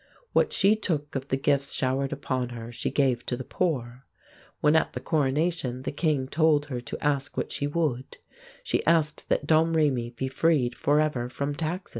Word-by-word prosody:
What - - +3
she 200 +2 +4
took 155 -9 -2
of 135 0 -3
the 135 - 0
gifts 140 0 +1
showered 135 +1 0
upon 130 -3 -2
her 120 -1 -7
she 115 - -3
gave 130 -4 +1
to 125 - -1
the 130 - -5
poor. 130 -7 -2 0.5
When 150 +1 +4
at 160 - +2
the - - -4
coronation 145 -3 0
the 135 - -2
king 145 -3 0
told 150 0 +3
her 125 -1 -3
to 120 - -7
ask 140 -1 0
what - - -2
she 145 - -1
would, 145 -5 -2 0.5
she - - 0
asked 160 -2 +2
that - - +1
Domrémy 155 -6 +2
be 130 +3 -2
freed 135 -2 +2
forever 145 -3 +1
from 140 +3 -3
taxes. 170 +6 -3
140 Hz, 180 wpm, -27 LUFS, 130-155 Hz, 0.5 s, she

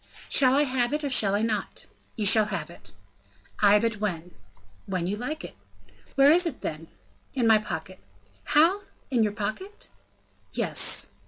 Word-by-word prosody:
"Shall 260 -2 +4
I 290 - +4
have 255 -1 -1
it, 300 +1 -2
or 285 - -2
shall 200 -5 +4
I 210 - 0
not?" 215 -3 -3 0.3
"You 215 - -2
shall 215 +2 +5
have 205 -2 -5
it." - - -14 0.7
"Ay, 205 0 +6
but 225 0 -1
when?" 180 -4 -4 0.6
"When 185 -3 -2
you 195 +3 -2
like." 275 - -6 0.6
"Where 275 +1 +6
is 350 +2 +3
it, 290 - -6
then?" 155 +1 -6 0.5
"In 250 -3 0
my 220 -1 +5
pocket." 185 -2 -7 0.5
"How 340 +7 +3 0.3
in 245 -3 +2
your 215 -1 +1
pocket?" 230 - -6 0.6
"Yes." - - +1
220 Hz, 160 wpm, -26 LUFS, 200-275 Hz, 0.7 s, Ay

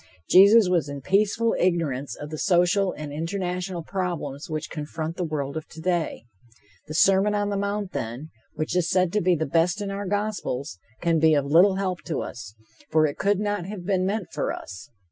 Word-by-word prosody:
Jesus 200 +2 +7
was 175 -5 +1
in 140 -1 -6
peaceful 210 - +2
ignorance 160 -7 0
of 150 +1 -8
the 155 - -4
social 180 +2 +3
and 150 -1 -7
international 180 +2 -3
problems 165 -6 -4
which 155 0 -3
confront 155 +1 -5
the 180 - -2
world 145 -3 -3
of 160 - -5
today. 165 -6 -2 0.6
The 155 - -6
Sermon 195 +4 +4
on 205 0 0
the 200 - -1
Mount, 200 -1 -2
then, 120 +8 -5 0.2
which 155 +2 -2
is 180 -2 +1
said 185 -2 +2
to 210 - +2
be 180 0 +3
the 160 0 -1
best 170 +6 +1
in 200 -1 -3
our 200 0 -4
gospels, 200 - -3 0.2
can 170 -2 +2
be 160 0 +5
of 140 -1 +1
little 175 +7 +5
help 185 -3 -2
to 160 - -2
us, 105 -4 -9 0.3
for 155 0 +4
it 145 - -3
could 200 0 +2
not 205 -3 -2
have 195 -3 -7
been 190 -1 +1
meant 195 0 -2
for - - -1
us. 95 -1 -8
175 Hz, 195 wpm, -25 LUFS, 155-195 Hz, 0.6 s, Jesus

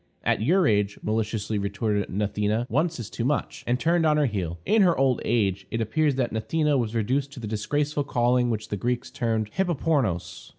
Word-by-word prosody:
"At - - +1
your 175 - +3
age," 105 -4 +1
maliciously 110 -1 -1
retorted 100 0 -1
Gnathena, 105 +3 -1
"once 160 +4 0
is 115 - -5
too 115 - -5
much," 140 +3 -1
and 125 +1 +1
turned 170 +2 +2
on 155 -1 +3
her 150 - +3
heel. 90 -8 -2
In 220 0 +4
her 180 -3 +4
old 130 -2 +2
age 100 -4 0
it 115 - -2
appears 140 +6 +1
that 125 -3 0
Gnathena 150 +7 +1
was 120 -3 -1
reduced 130 +6 0
to 140 - -9
the 115 - -6
disgraceful 145 +8 -1
calling 125 -1 +2
which 110 -2 -3
the 105 - -2
Greeks 120 +4 -2
termed 110 -3 -1
hippopornos. 150 - -1
120 Hz, 195 wpm, -25 LUFS, 105-145 Hz, -, In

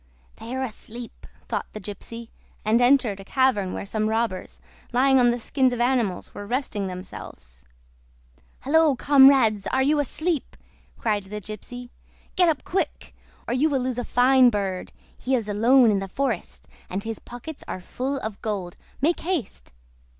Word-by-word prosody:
"They 235 +3 -6
are 260 - -1
asleep," 235 0 -8 0.2
thought - - -2
the 215 - -6
gypsy, 225 +3 -8 0.4
and 225 +3 +3
entered 245 -5 +3
a - - -8
cavern 210 -5 +1
where - - -5
some 215 +1 -1
robbers, 220 -4 -2 0.3
lying 265 +2 +4
on 245 -1 +5
the 240 - +1
skins 255 +2 +1
of 245 - -4
animals, 240 -7 0
were 205 - -8
resting 225 -5 -2
themselves. 65 - -9 1.0
"Halloa, 310 0 +4
comrades! 265 -8 +5
Are 265 - +1
you 295 +2 +3
asleep?" 310 +2 -2 0.4
cried 210 -3 -1
the 210 +2 -6
gypsy. 240 +5 -8 0.4
"Get 360 -2 +4
up, 305 -3 -1
quick! 380 - -3 0.3
or - - -1
you 285 +5 +2
will 270 -3 0
lose 250 -1 -2
a - - -2
fine 255 +1 +5
bird. 195 -4 -3 0.3
He 260 +1 0
is 230 -4 -2
alone 230 +3 +5
in 200 - +1
the 195 - -4
forest, 240 -2 -3 0.2
and 190 +2 -3
his 225 0 -5
pockets 260 +6 -9
are - - -4
full 260 +9 -3
of 215 -2 -6
gold. 195 -5 -4 0.2
Make 330 +5 +2
haste!" 320 - -4
240 Hz, 165 wpm, -24 LUFS, 205-265 Hz, 1.0 s, on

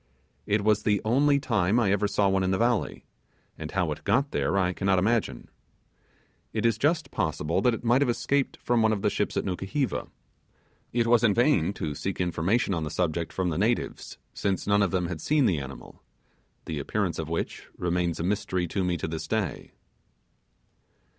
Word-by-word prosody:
It 105 0 +1
was 105 0 +3
the 105 -1 +2
only 140 +5 +3
time 110 -5 +1
I 100 -5 +2
ever 105 +1 +2
saw 100 0 +1
one 95 0 +2
in 95 - 0
the 95 - +1
valley, 120 -1 0 0.5
and 80 -1 -7
how 90 -3 0
it 75 - -6
got 135 +8 +1
there 100 - 0
I 90 -1 +1
cannot 95 +1 +1
imagine. 100 - 0 1.1
It - - -1
is 115 -2 +2
just 150 -1 +1
possible 80 +1 -1
that 125 -2 +3
it - - -10
might 120 +3 +3
have 140 - +2
escaped 135 +3 0
from 120 -1 +2
one 110 0 +3
of 100 - -3
the - - +2
ships - - -1
at - - -1
Nukuheva. 95 +9 -2 0.8
It 120 -1 +1
was 120 0 +4
in 105 -4 +4
vain 115 - +3
to 75 -6 -4
seek 95 +6 -4
information 90 +5 +1
on 85 -3 -1
the 75 - -3
subject 85 0 -1
from 95 -1 -1
the 80 - -2
natives, 115 +4 -1 0.2
since 95 -2 -1
none 100 0 +3
of 100 - +2
them 90 +1 0
had 85 -3 -5
seen 150 - +2
the 90 -9 +2
animal, 70 0 -10 0.6
the 80 -3 -4
appearance 90 +3 -2
of 80 -1 -4
which 85 - -4
remains 85 -1 -1
a - - -2
mystery 95 -1 -1
to 95 +1 -1
me 90 -1 0
to - - -3
this 80 0 -5
day. 110 -6 -2
100 Hz, 195 wpm, -27 LUFS, 90-115 Hz, 1.1 s, was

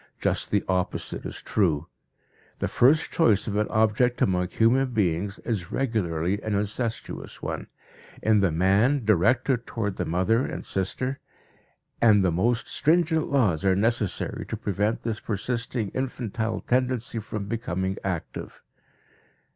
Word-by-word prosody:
Just - - +1
the 100 - +1
opposite 90 -1 -2
is - - -8
true. 80 -7 +1 0.7
The - - -1
first 145 +6 +3
choice 110 - +3
of 105 - -3
an 105 0 +1
object 110 +3 +2
among 90 -1 +2
human 125 +6 +2
beings 95 -2 0
is 100 -8 -4
regularly 100 -7 -1
an 110 -2 -2
incestuous 110 +3 -3
one, - - -4 0.6
in 110 -1 +4
the 95 -4 +2
man 100 - +2
directed 115 +5 +2
toward 105 -4 -3
the - - -1
mother 95 +8 +2
and - - -5
sister, 125 +8 -2 0.8
and 105 -4 +5
the 90 - +3
most 115 +8 +1
stringent 160 0 +2
laws 110 - +2
are 95 -1 +3
necessary 110 -1 0
to - - -4
prevent 105 +2 -1
this 115 -2 -2
persisting 115 +1 -2
infantile 115 -3 -3
tendency 125 -2 0
from 105 -1 -5
becoming 95 -4 -2
active. 90 -4 -5
110 Hz, 135 wpm, -26 LUFS, 95-120 Hz, 0.8 s, and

